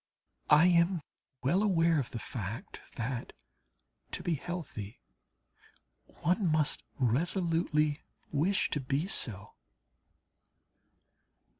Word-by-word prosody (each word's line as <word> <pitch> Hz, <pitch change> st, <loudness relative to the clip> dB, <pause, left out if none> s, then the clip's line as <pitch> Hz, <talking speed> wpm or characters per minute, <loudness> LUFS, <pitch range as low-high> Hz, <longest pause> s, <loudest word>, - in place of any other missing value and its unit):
I 150 Hz, +3 st, +7 dB
am 170 Hz, -1 st, +3 dB, 0.4 s
well 175 Hz, +10 st, +3 dB
aware 170 Hz, -6 st, +3 dB
of 130 Hz, -, -3 dB
the -, -, -6 dB
fact 110 Hz, -1 st, -6 dB
that, 120 Hz, 0 st, -4 dB, 0.8 s
to -, -, -2 dB
be 175 Hz, -, +1 dB
healthy, 150 Hz, -, -6 dB, 1.2 s
one 180 Hz, +1 st, +2 dB
must 155 Hz, -1 st, +1 dB
resolutely 155 Hz, -, +1 dB, 0.3 s
wish 170 Hz, +7 st, +1 dB
to 150 Hz, -, 0 dB
be 135 Hz, +4 st, -1 dB
so. 105 Hz, -, +1 dB
155 Hz, 95 wpm, -31 LUFS, 130-175 Hz, 1.2 s, I